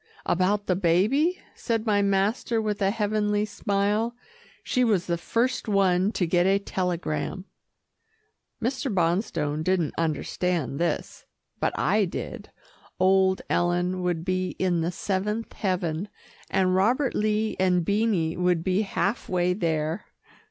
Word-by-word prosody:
"About 200 Hz, +3 st, +1 dB
the 180 Hz, -, +1 dB
baby?" 210 Hz, -, +2 dB, 0.2 s
said 225 Hz, -1 st, -2 dB
my 205 Hz, -2 st, +3 dB
master 200 Hz, +4 st, +1 dB
with 210 Hz, -2 st, -2 dB
a 195 Hz, -, +3 dB
heavenly 210 Hz, 0 st, 0 dB
smile. 210 Hz, +3 st, 0 dB, 0.5 s
"She 250 Hz, -, +1 dB
was 205 Hz, -7 st, +2 dB
the 170 Hz, -, 0 dB
first 230 Hz, +9 st, -1 dB
one 195 Hz, -1 st, +3 dB
to 180 Hz, -, 0 dB
get 175 Hz, +2 st, +2 dB
a 195 Hz, +1 st, +4 dB
telegram." 180 Hz, -2 st, -3 dB, 1.1 s
Mr. 260 Hz, +2 st, -2 dB
Bonstone 165 Hz, -4 st, 0 dB
didn't 180 Hz, -3 st, +1 dB
understand 165 Hz, -2 st, -1 dB
this, 170 Hz, 0 st, -2 dB, 0.3 s
but -, -, -1 dB
I 205 Hz, +5 st, +2 dB
did. 175 Hz, -, -6 dB, 0.5 s
Old 190 Hz, 0 st, +3 dB
Ellen 175 Hz, +1 st, 0 dB
would 175 Hz, -2 st, -1 dB
be 185 Hz, -1 st, -1 dB
in 175 Hz, -3 st, +1 dB
the 165 Hz, +2 st, -1 dB
seventh 205 Hz, +5 st, -2 dB
heaven, 185 Hz, -1 st, -2 dB, 0.4 s
and 185 Hz, -1 st, +2 dB
Robert 240 Hz, +8 st, +2 dB
Lee 215 Hz, +1 st, 0 dB
and 180 Hz, -2 st, +2 dB
Beanie 200 Hz, -6 st, +1 dB
would 180 Hz, -2 st, +1 dB
be 190 Hz, +2 st, +1 dB
half 205 Hz, +1 st, -2 dB
way 180 Hz, 0 st, +1 dB
there. 160 Hz, -1 st, -1 dB
190 Hz, 130 wpm, -26 LUFS, 175-210 Hz, 1.1 s, a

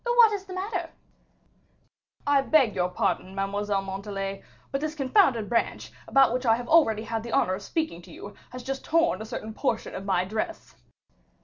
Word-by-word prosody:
"What's 455 Hz, -5 st, +4 dB
the 370 Hz, -1 st, -8 dB
matter?" 370 Hz, -3 st, -3 dB, 1.4 s
"I 285 Hz, -1 st, +4 dB
beg 270 Hz, -6 st, +3 dB
your 180 Hz, 0 st, 0 dB
pardon, 185 Hz, +1 st, -1 dB
Mademoiselle 200 Hz, 0 st, -1 dB
Montalais, 195 Hz, 0 st, -4 dB, 0.3 s
but 275 Hz, -, -1 dB
this 310 Hz, 0 st, -3 dB
confounded 270 Hz, -, +3 dB
branch, 235 Hz, +1 st, -1 dB, 0.2 s
about 270 Hz, -3 st, +5 dB
which 250 Hz, +1 st, -1 dB
I 225 Hz, -, +6 dB
have 240 Hz, +1 st, -6 dB
already 225 Hz, -10 st, +4 dB
had 225 Hz, 0 st, -3 dB
the 235 Hz, 0 st, -7 dB
honor 185 Hz, -, +3 dB
of 190 Hz, -, -4 dB
speaking 255 Hz, -, -3 dB
to -, -, -15 dB
you, 205 Hz, -, -9 dB, 0.2 s
has 250 Hz, 0 st, -8 dB
just 270 Hz, +1 st, -4 dB
torn 330 Hz, -, +2 dB
a -, -, -5 dB
certain 220 Hz, -1 st, -6 dB
portion 225 Hz, -2 st, -2 dB
of 195 Hz, -, -6 dB
my 185 Hz, -2 st, +1 dB
dress." 225 Hz, -, -4 dB
230 Hz, 180 wpm, -27 LUFS, 200-310 Hz, 1.4 s, I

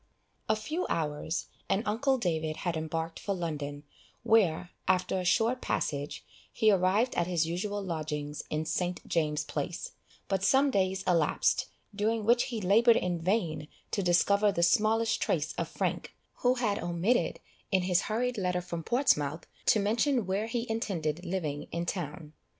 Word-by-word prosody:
A 220 Hz, -, +4 dB
few 310 Hz, +12 st, -3 dB
hours, 155 Hz, +1 st, -2 dB, 0.2 s
and 200 Hz, -, +1 dB
uncle 255 Hz, +6 st, +1 dB
David 160 Hz, -7 st, -1 dB
had 175 Hz, -2 st, 0 dB
embarked 160 Hz, +1 st, -3 dB
for 200 Hz, -, -2 dB
London, 145 Hz, -4 st, -4 dB, 0.4 s
where, 180 Hz, -6 st, +3 dB, 0.2 s
after 185 Hz, 0 st, +2 dB
a -, -, -2 dB
short 230 Hz, +7 st, +2 dB
passage, 145 Hz, -1 st, -2 dB, 0.3 s
he 220 Hz, -1 st, +3 dB
arrived 195 Hz, +6 st, +2 dB
at 170 Hz, -, 0 dB
his 170 Hz, -3 st, +1 dB
usual 200 Hz, +5 st, -3 dB
lodgings 150 Hz, -4 st, -4 dB
in 155 Hz, +1 st, -1 dB
St. 180 Hz, +2 st, -2 dB
James' 150 Hz, -3 st, 0 dB
Place; -, -, -4 dB, 0.4 s
but 195 Hz, -1 st, 0 dB
some 275 Hz, +5 st, +4 dB
days 190 Hz, -3 st, +1 dB
elapsed, 170 Hz, -5 st, +2 dB, 0.3 s
during 215 Hz, +1 st, 0 dB
which 240 Hz, +2 st, +4 dB
he 235 Hz, -3 st, -4 dB
laboured 225 Hz, +5 st, +5 dB
in 175 Hz, -1 st, -1 dB
vain 165 Hz, -5 st, 0 dB, 0.2 s
to 200 Hz, -, 0 dB
discover 200 Hz, +3 st, +3 dB
the 170 Hz, -, 0 dB
smallest 220 Hz, +5 st, +3 dB
trace -, -, 0 dB
of -, -, -3 dB
Frank, -, -, -3 dB, 0.2 s
who 250 Hz, +1 st, +2 dB
had 220 Hz, -5 st, 0 dB
omitted, 175 Hz, +8 st, 0 dB, 0.3 s
in 190 Hz, -2 st, +3 dB
his 180 Hz, 0 st, +3 dB
hurried 240 Hz, +1 st, 0 dB
letter 180 Hz, -1 st, 0 dB
from 175 Hz, -1 st, -5 dB
Portsmouth, 160 Hz, -, +1 dB, 0.2 s
to 215 Hz, -, +5 dB
mention 230 Hz, +4 st, +1 dB
where 195 Hz, +4 st, -1 dB
he 235 Hz, +1 st, -2 dB
intended 175 Hz, -8 st, -2 dB
living 170 Hz, -6 st, -3 dB
in 170 Hz, 0 st, -2 dB
town. 155 Hz, -3 st, -5 dB
185 Hz, 155 wpm, -30 LUFS, 165-220 Hz, 0.4 s, laboured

